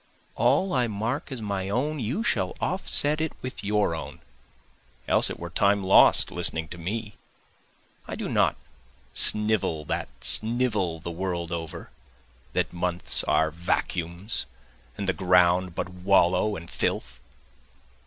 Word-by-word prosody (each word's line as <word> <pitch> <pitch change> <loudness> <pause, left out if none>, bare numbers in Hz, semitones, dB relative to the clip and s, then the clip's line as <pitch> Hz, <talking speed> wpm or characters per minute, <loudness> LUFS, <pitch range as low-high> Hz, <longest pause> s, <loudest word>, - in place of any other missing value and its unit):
All 190 0 +1
I 125 -3 +1
mark 115 +7 -4
as 125 -4 -4
my 100 -2 -3
own 145 +8 -2
you 130 - -2
shall 95 - -1
offset 150 +2 +3
it 160 - -2
with 130 -4 -6
your 105 -3 0
own, 80 - -7 0.9
Else - - +5
it - - -7
were 85 0 -7
time 100 +2 +1
lost 95 - +5
listening 80 0 -1
to 85 - -8
me. 105 +4 -5 0.9
I - - -5
do - - -5
not - - +1 0.6
snivel 105 -8 +1
that - - -3
snivel 110 -7 0
the 85 - -7
world 85 -1 -4
over, 85 0 -6 0.6
That - - -1
months 90 0 +4
are 80 0 +1
vacuums 85 +3 -1 0.5
and 100 - -4
the 95 - +1
ground 90 0 +2
but - - -3
wallow 90 +2 +1
and 85 -2 -9
filth. 60 -5 -3
95 Hz, 135 wpm, -25 LUFS, 85-110 Hz, 0.9 s, Else